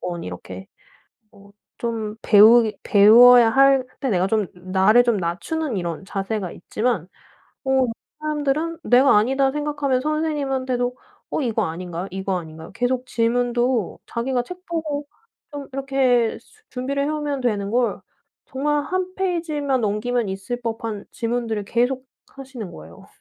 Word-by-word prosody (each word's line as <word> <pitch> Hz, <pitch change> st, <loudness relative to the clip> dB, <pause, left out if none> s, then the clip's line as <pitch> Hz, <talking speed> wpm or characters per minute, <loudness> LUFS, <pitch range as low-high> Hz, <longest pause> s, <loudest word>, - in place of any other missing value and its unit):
어 175 Hz, -1 st, -4 dB
이렇게 95 Hz, -, -8 dB, 0.7 s
어 200 Hz, -1 st, -18 dB, 0.3 s
좀 225 Hz, -2 st, -3 dB
배우기 220 Hz, +1 st, +6 dB
배워야 230 Hz, +3 st, +7 dB
할 270 Hz, +1 st, +4 dB, 0.2 s
때 265 Hz, -, -1 dB
내가 185 Hz, -2 st, +1 dB
좀 215 Hz, -1 st, 0 dB
나를 190 Hz, +6 st, +3 dB
좀 235 Hz, -2 st, +2 dB
낮추는 210 Hz, -, -3 dB
이런 170 Hz, 0 st, -4 dB
자세가 195 Hz, -1 st, -3 dB
있지만 215 Hz, -3 st, -2 dB, 0.6 s
어 265 Hz, -, -2 dB, 0.5 s
사람들은 305 Hz, +2 st, -2 dB
내가 255 Hz, 0 st, +5 dB
아니다 265 Hz, +5 st, +2 dB
생각하면 290 Hz, -3 st, -1 dB
선생님한테도 270 Hz, -5 st, -1 dB, 0.3 s
"어 -, -, -1 dB
이거 225 Hz, -5 st, 0 dB
아닌가요? 175 Hz, +2 st, -5 dB
이거 190 Hz, 0 st, -2 dB
아닌가요?" 160 Hz, 0 st, -11 dB
계속 250 Hz, +1 st, -1 dB
질문도 240 Hz, -1 st, 0 dB
자기가 245 Hz, +1 st, -1 dB
책 360 Hz, +6 st, -11 dB
보고 310 Hz, -4 st, -3 dB, 0.5 s
좀 285 Hz, -1 st, -7 dB
이렇게 265 Hz, -4 st, +1 dB
수 435 Hz, 0 st, -26 dB
준비를 275 Hz, +2 st, -2 dB
해오면 295 Hz, -2 st, -2 dB
되는 205 Hz, -4 st, -1 dB
걸 245 Hz, 0 st, 0 dB, 0.5 s
정말 290 Hz, +2 st, -1 dB
한 370 Hz, +2 st, -3 dB
페이지만 320 Hz, -8 st, -1 dB
넘기면 220 Hz, +2 st, -1 dB
있을 195 Hz, +6 st, -5 dB
법한 225 Hz, -2 st, -4 dB
질문들을 230 Hz, -3 st, -2 dB
계속 250 Hz, +4 st, 0 dB, 0.3 s
하시는 260 Hz, -7 st, -9 dB
거예요. 80 Hz, +2 st, -13 dB
245 Hz, 295 characters per minute, -22 LUFS, 210-275 Hz, 0.7 s, 배워야